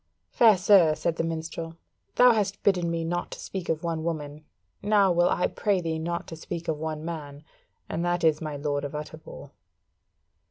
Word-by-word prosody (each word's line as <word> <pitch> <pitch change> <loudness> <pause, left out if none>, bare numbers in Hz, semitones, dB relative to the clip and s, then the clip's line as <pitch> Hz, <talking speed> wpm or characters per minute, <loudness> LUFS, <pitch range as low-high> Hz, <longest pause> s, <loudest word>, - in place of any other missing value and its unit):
"Fair 220 -4 +6
sir," 180 -4 +5
said 165 +1 -2
the - - 0
minstrel; 165 0 -5 0.4
"thou 250 0 +7
hast 200 -3 -1
bidden 180 -4 +2
me 165 0 -2
not 175 +2 -3
speak 190 -3 -6
of 160 0 -1
one 165 -2 -2
woman, 155 -2 -4 0.4
now 200 -2 +3
will 175 0 +3
I 180 - +1
pray 205 -3 0
thee 165 -2 -2
not 170 +1 -3
to 165 - -7
speak 170 +1 -6
of 155 -2 -1
one 155 0 -4
man, 150 -3 -7 0.4
and 170 - -3
that 175 0 0
is 155 -1 +3
my 155 -2 -4
Lord 145 0 -2
of 145 +1 -5
Utterbol." 150 -1 -9
165 Hz, 185 wpm, -26 LUFS, 155-175 Hz, 0.4 s, thou